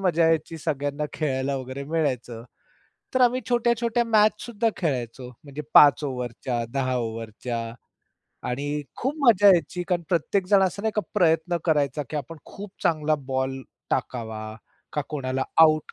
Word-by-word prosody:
मजा 170 -3 +3
यायची. 165 0 0
सगळ्यांना 145 -1 -2
खेळायला 135 -2 -1
वगैरे 130 +1 -6
मिळायचं. 130 -7 -2 0.7
तर 255 - +2
आम्ही 250 +1 +4
छोट्या-छोट्या 235 0 +1
मॅच 215 -2 +4
सुद्धा 230 -1 0
खेळायचो 125 -6 -3 0.2
म्हणजे 145 +1 -7
5 145 0 +7
ओव्हरच्या, 125 -2 -3
10 130 -1 0
ओव्हरच्या. 115 0 -4 0.8
आणि 145 +4 -2
खूप 265 +4 -2
मजा 205 -3 +6
यायची 180 -1 +3
कारण 175 -2 +1
प्रत्येक 180 +3 0
जण 195 -1 +5
असं 190 +2 -1
नाही 220 -1 0
का - - +4
प्रयत्न 170 -2 +2
करायचा 150 -3 +1
की 155 - -3
आपण 150 +3 -5
खूप 200 0 -9
चांगला 155 -1 +2
बॉल 130 0 -2 0.3
टाकावा 110 -3 -3 0.4
का, 150 - -1
कोणाला 130 -3 -2 0.2
आउट 155 -1 +4
150 Hz, 145 wpm, -25 LUFS, 130-185 Hz, 0.8 s, 5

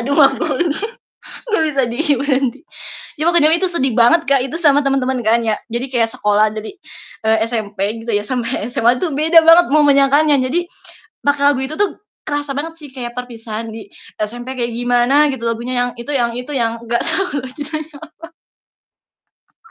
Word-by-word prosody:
Aduh 280 +4 -1
aku - - +4
lagi 345 - 0 0.8
gak 420 -7 +2
bisa 275 -3 0
diam 280 +1 0
nanti. 270 -2 0 0.6
Ya 305 - -2
waktu 340 -3 +3
jaman 320 +2 +4
itu 375 - +1
sedih 270 -8 -1
banget 245 +8 +4
Kak, 275 -2 +4
itu 270 +5 -4
sama 290 -4 +4
temen-temen 265 -2 0
kan 230 +1 +3
ya, 220 - +1 0.2
jadi 240 +3 -3
kayak 230 -2 +1
sekolah 210 +1 +2
dari, 215 0 -6 0.5
eee, 220 0 +3
SMP 210 -4 -4 0.2
gitu 235 - -9
ya 205 - 0
sampai 245 -3 -2
SMA 240 +2 +3
itu 360 - -1
beda 320 +4 +5
banget 335 +2 +7
mau 305 -1 +5
menyangkanya, 285 +2 +4
jadi 320 +8 -1 0.6
makna 285 0 +4
lagu 265 - -2
itu 310 - -6
tuh 410 0 -1 0.2
kerasa 290 -1 -3
banget 325 +3 -4
sih 300 - -10
kayak 240 -2 -5
perpisahan 230 -2 -7
di 220 -2 -10 0.3
SMP 240 +5 -4
kayak 240 -1 -1
gimana 245 +2 +2 0.2
gitu, 235 -3 -7
lagunya 235 +2 -3
yang - - -4
itu 240 +5 -6
yang 235 -3 +1
itu 250 +4 -6
yang 230 -3 +1 0.2
gak 235 +1 0
tahu 295 -8 -1
gunanya 300 +3 -7 1.6
apa. 450 - -25
260 Hz, 180 wpm, -17 LUFS, 235-295 Hz, 1.6 s, banget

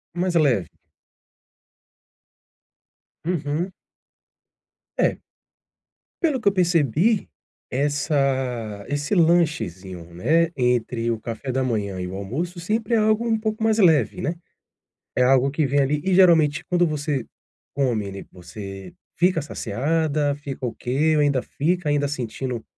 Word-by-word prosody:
Mais 180 0 -1
leve. 130 - +3 2.6
Uhum. 170 +2 -2 1.2
É. - - +2 1.0
Pelo 305 -7 +2
que 220 - -2
eu - - +6
percebi 175 - +2 0.4
essa 130 -6 -1
esse 145 +7 -1
lanchezinho, 100 - 0
né, 165 - +2
entre 125 -2 0
o 115 - -2
café 115 +4 -5
da 130 +1 0
manhã 105 -6 -2
e 90 - -3
o 95 - -6
almoço 150 - -4
sempre 215 +5 -1
é - - +5
algo 220 +2 +2
um 225 -1 +2
pouco 220 0 -2
mais 220 0 +2
leve, 165 -6 +3
né, 165 - -1 0.8
é 125 - +5
algo 135 +1 +4
que 150 +2 0
vem, 140 +1 +1
ali 145 +2 0
e 190 - +2
geralmente 165 -5 +5
quando 175 -1 +2
você 150 -4 -2 0.5
come, 115 -8 0
né, 100 - -8
você 95 +1 -9 0.2
fica 180 -2 +3
saciada, 145 +3 -1
fica 140 -2 -8
ok 135 +6 0
ou - - +4
ainda 140 -3 +2
fica 165 +4 -1
ainda 145 -1 +1
sentindo 125 -3 -4
145 Hz, 130 wpm, -23 LUFS, 120-170 Hz, 2.6 s, eu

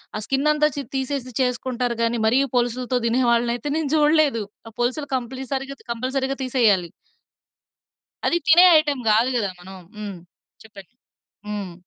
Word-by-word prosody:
ఆ - - -2
స్కిన్ 275 +4 +1
అంతా 300 0 +3
చి 285 - -3
తీసేసి 265 -1 -3
చేసుకుంటారు 250 -1 -1
గాని 230 +1 0
మరీ 235 +4 +3 0.2
పోలుసులతో 245 +1 0
తినే 240 +3 +1
వాళ్ళనైతే 235 +3 0
నేను 315 -3 -2
చూడలేదు. 295 -6 +3 0.3
ఆ - - -17
పోలుసులు 255 +5 -1
కంప్లీసరిగా 265 +2 -5
కంపల్సరీగా 265 +3 -2
తీసేయాలి. 220 -9 +2 1.4
అది 345 - +2
తినే 345 +3 +8
ఐటెమ్ 290 -4 -2
గాదు 225 +4 +3
గదా, 200 -4 -1
మనం. 190 +2 -11 0.2
హ్మ్. 205 -4 -7 0.4
చెప్పండి. 205 -1 -15 0.5
హ్మ్. 205 -4 -5
250 Hz, 135 wpm, -22 LUFS, 230-275 Hz, 1.4 s, తినే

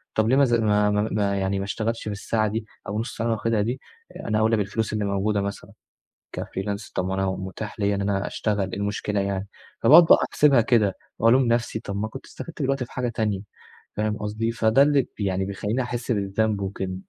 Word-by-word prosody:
طَب 110 +1 +2
ليه 130 - +4
ما 140 - +6
أذا 120 -3 +3
ما 105 -1 +3
ما 105 +1 +1
ما 100 -1 0
يعني 95 0 0
ما 100 - -3
اشتغلتش 115 +3 -2
في 105 - -4
الساعة 110 +2 -1
دي 110 +1 -3 0.2
أو 100 - -4
النُّص 115 +3 -4
ساعة 115 - -2
اللي - - +1
أنا - - 0
واخدها 115 -2 +1
دي 120 +5 -2 0.4
آآ، - - -8
أنا 110 0 +1
أولي 110 +1 +3
بالفلوس 105 +2 -2
اللي 105 -1 -1
موجودة 100 +1 0
مثلًا 100 0 -5 0.7
كfreelance 100 +2 -5
طَب 90 0 -1
ما 95 - -2
أنا 95 0 0
متاح 95 +3 -5
ليَّ 100 0 +2
إن 100 - -2
أنا 100 0 0
أشتغل، 100 -3 -1
إيه - - -4
المشكلة 105 0 -1
يعني؟ 100 0 -2 0.3
فباقعد 155 +9 +9
بقى - - +7
أحسبها 140 -4 +5
كده 110 -5 +2 0.2
وألوم 120 +4 +5
نفسي، 115 -1 0
طَب 100 -2 -5
ما 110 +2 -2
كنت 130 - -10
استفدت 165 -3 -8
بالوقت 135 0 0
ده 125 - -2
في - - -18
حاجة 125 -1 -2
تانية، 105 -4 -1 0.6
فاهم 105 +1 0
قصدي؟ 110 +2 -2
فده 110 +3 +3
اللي 140 -2 +4
يعني 95 -2 0
بيخلّيني 105 +5 -2
أحِس 120 0 -3
بالذنب 100 0 0
وكده. 95 -1 -3
105 Hz, 220 wpm, -24 LUFS, 100-115 Hz, 0.7 s, فباقعد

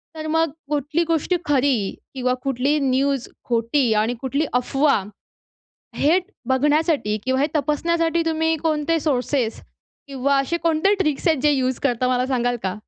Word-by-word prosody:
तर 310 0 -5
मग 325 0 +1 0.2
कुठली 295 +3 0
गोष्टी 330 +2 +1
खरी 265 -8 +1 0.2
किंवा 250 -1 0
कुठली 275 +2 +1
न्यूज 270 -1 0 0.2
खोटी 235 +1 +1
आणि 215 +3 +1
कुठली 280 +4 -1
अफवा 270 +4 +2 1.0
हे 320 +6 +3 0.3
बघण्यासाठी 290 -4 +1
किंवा 260 +1 0
हे 290 - +2
तपासण्यासाठी 330 +3 +1
तुम्ही 320 0 +1
कोणते 315 +1 0
सोर्सेस 260 -4 -1 0.5
किंवा 275 0 0
असे 275 +5 -1
कोणते 330 +4 +3
ट्रिक्स 305 -2 0
आहेत 315 -4 +3
जे 300 - +5
युज 260 -2 0
करता 250 -2 +1
मला 250 0 +1
सांगाल 245 -2 0
का? 190 -1 -1
280 Hz, 145 wpm, -22 LUFS, 255-315 Hz, 1.0 s, जे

